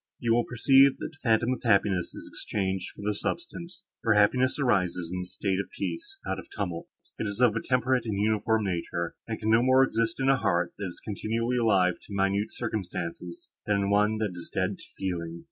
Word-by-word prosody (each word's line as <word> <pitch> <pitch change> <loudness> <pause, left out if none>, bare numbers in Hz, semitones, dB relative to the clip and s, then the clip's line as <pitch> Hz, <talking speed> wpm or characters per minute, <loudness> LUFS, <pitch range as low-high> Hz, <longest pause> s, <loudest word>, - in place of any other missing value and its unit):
You 115 -1 +1
will 120 0 +2
perceive, 135 +2 +5
that - - -5
the 150 - -20
phantom 120 +1 +2
of 125 - -6
happiness 100 -3 +2
is - - -8
exchanged 95 -3 -2
for - - -11
the 105 +1 0
substance; 170 - -5 0.2
for 115 -2 +3
happiness 125 +5 +3
arises 90 - +1
in 90 - -2
a - - -5
state 95 +1 -2
of 100 - -3
peace, 390 +4 -4
not - - -2
of - - -11
tumult. 90 -5 -4 0.3
It - - -1
is 100 +2 -5
of 120 -4 +4
a 115 - -1
temperate 125 -1 +1
and 105 -3 -1
uniform 110 +1 +2
nature, 85 -2 -2
and 110 -1 -4
can 110 0 0
no 115 +1 +6
more 130 +1 +5
exist 115 -2 0
in 135 - +1
a 135 0 +5
heart, 85 -7 0
that 100 - -2
is 85 - -9
continually 115 +3 -1
alive 95 -7 +3
to 100 - -9
minute 100 +2 +1
circumstances, 90 -6 -5 0.2
than 105 - +3
in 100 0 0
one 105 +2 +3
that 105 -3 -1
is 85 -1 -8
dead 95 +1 -1
to - - -12
feeling. 85 -3 -3
105 Hz, 215 wpm, -28 LUFS, 95-120 Hz, 0.3 s, no